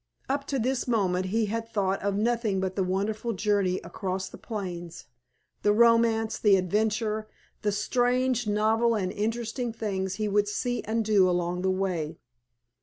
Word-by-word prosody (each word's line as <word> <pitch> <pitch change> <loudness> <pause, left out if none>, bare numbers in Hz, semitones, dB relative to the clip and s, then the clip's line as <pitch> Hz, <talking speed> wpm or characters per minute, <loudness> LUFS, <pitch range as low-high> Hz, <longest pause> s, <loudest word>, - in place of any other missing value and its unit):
Up 280 +1 -2
to 275 - -1
this 260 +1 -1
moment 185 -6 +1
he 220 +3 +1
had 225 +2 -3
thought 195 -3 0
of 200 0 0
nothing 220 -2 +1
but 190 0 -2
the 195 - +1
wonderful 205 +5 -1
journey 200 -2 +1
across 190 -1 -4
the - - -11
plains, 175 -6 -6 0.6
the 205 - +3
romance, 230 -1 +3
the 205 -2 +5
adventure, 215 +3 0 0.3
the 210 - +1
strange, 245 +3 +1
novel, 220 +3 +2
and 185 -3 -1
interesting 230 +3 -2
things 190 -4 -3
he 215 +1 -1
would 205 0 +2
see 245 +4 -1
and 225 0 0
do 200 -4 +4
along 175 0 -1
the 190 - +1
way. 180 -5 -1
210 Hz, 160 wpm, -27 LUFS, 190-230 Hz, 0.6 s, the